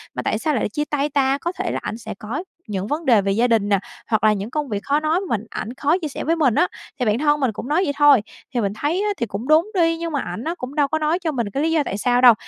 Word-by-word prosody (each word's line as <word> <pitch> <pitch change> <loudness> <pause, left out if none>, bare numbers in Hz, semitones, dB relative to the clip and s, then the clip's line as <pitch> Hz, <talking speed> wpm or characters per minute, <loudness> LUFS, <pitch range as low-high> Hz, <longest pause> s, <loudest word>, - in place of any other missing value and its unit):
mà - - -2
tại - - -1
sao 305 -2 0
lại 225 - 0
chia 295 +8 -2
tay 295 0 0
ta, 275 -1 +2
có 340 +4 -3
thể - - -1
là - - -2
ảnh 220 - -4
sẽ 230 - -7
có 235 - -4 0.2
những 200 -1 -3
vấn 310 +2 -2
đề 230 -5 +5
về 195 0 0
gia 230 +5 +2
đình 220 -4 +2
nè, 200 -2 +3 0.3
hoặc 220 -2 +1
là 215 - +5
những 205 +2 -4
công 295 -1 -3
việc 205 -2 -3
khó 290 +2 +2
nói 310 +3 +1
mình 230 - -2
ảnh 235 - -5
khó 295 +6 +1
chia 310 - -2
sẻ 285 - -5
với 330 +3 +1
mình 270 -8 +2
á, 360 - +4 0.3
thì 250 - +1
bạn 215 +2 +2
thân 295 0 +2
mình 265 -5 +1
cũng 220 +4 -7
nói 315 +5 +2
vậy 285 -5 -1
thôi. 290 -5 +6 0.3
Thì 240 - +1
mình 200 0 -1
thấy 300 - 0
á 420 - 0
thì 235 - -1
cũng 220 +3 -6
đúng 320 +7 +4
đi, 330 -3 +2
nhưng 335 0 -4
mà 285 - -1
ảnh 180 +7 -5
á, 335 +2 -2
cũng 255 0 -7
đâu 290 -2 +3
có 315 +2 -1
nói 310 +3 +1
cho 330 -4 -1
mình 235 -7 -2
cái 275 +8 -2
lý 325 - +1
do 320 -2 +2
tại 195 - -3
sao 245 +3 +2
đâu, 245 -2 +9
275 Hz, 320 wpm, -21 LUFS, 225-310 Hz, 0.3 s, đâu